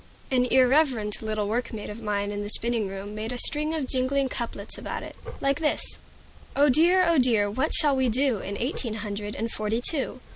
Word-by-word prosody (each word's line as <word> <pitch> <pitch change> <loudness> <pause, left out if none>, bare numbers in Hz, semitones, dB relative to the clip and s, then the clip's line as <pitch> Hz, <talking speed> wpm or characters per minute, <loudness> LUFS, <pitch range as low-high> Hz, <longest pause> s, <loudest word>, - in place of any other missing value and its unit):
An 250 -1 +3
irreverent 255 -4 +2
little 215 -2 -2
workmate 220 -1 -3
of 220 +3 -9
mine 205 -1 -2
in 205 0 -4
the 205 - -5
spinning 230 -1 +3
room 195 +2 -7
made 215 +2 -5
a 250 - -4
string 300 +5 +2
of 305 -4 -2
jingling 265 +1 0
couplets 230 -4 -4
about - - -5
it, - - -10 0.3
like 275 +1 +1
this: 305 -2 -1 0.6
"Oh 290 +1 +4
dear! 350 +7 +4
oh 335 -3 +3
dear! 225 -5 +4
what 265 +8 -1
shall 290 -3 +4
we 260 -1 +1
do 255 -1 +1
In 200 +1 -5
eighteen 240 -3 -2
hundred 205 -1 -5
and 225 +1 -3
forty 215 +2 -2
two? 265 0 -2
240 Hz, 195 wpm, -25 LUFS, 210-275 Hz, 0.6 s, Oh